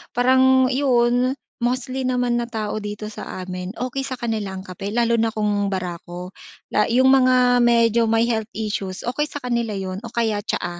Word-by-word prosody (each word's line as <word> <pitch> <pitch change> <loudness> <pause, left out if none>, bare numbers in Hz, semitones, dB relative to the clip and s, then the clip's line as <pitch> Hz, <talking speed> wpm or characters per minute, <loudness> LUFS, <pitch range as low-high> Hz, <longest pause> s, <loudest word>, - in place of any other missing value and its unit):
parang, 260 +1 +4
yun, 250 -1 +2 0.2
mostly 255 +2 -1
naman 245 -1 +1
na 235 - -3
tao 215 -2 -3
dito 210 0 -6
sa 185 - -7
amin, 180 +1 -6
okey 255 +2 -3
sa 260 - -4
kanila 220 -5 -3
ang 190 - -7
kape 185 +1 -7
lalo 235 -1 +2
na 225 - +2
kung 205 -2 0
barako, 180 0 -5 0.4
la 210 - +3
yung 255 +3 +4
mga 255 -2 +4
medyo 235 -1 +4
may 225 +1 +3
health 220 -2 -1
issues, 205 -3 -3
okey 255 +5 -1
sa 290 - -7
kanila 235 -3 -1
yun 190 -1 -4
o 235 - -8
kaya 220 -3 0
tsaa. 175 -4 -3
235 Hz, 180 wpm, -22 LUFS, 205-250 Hz, 0.4 s, parang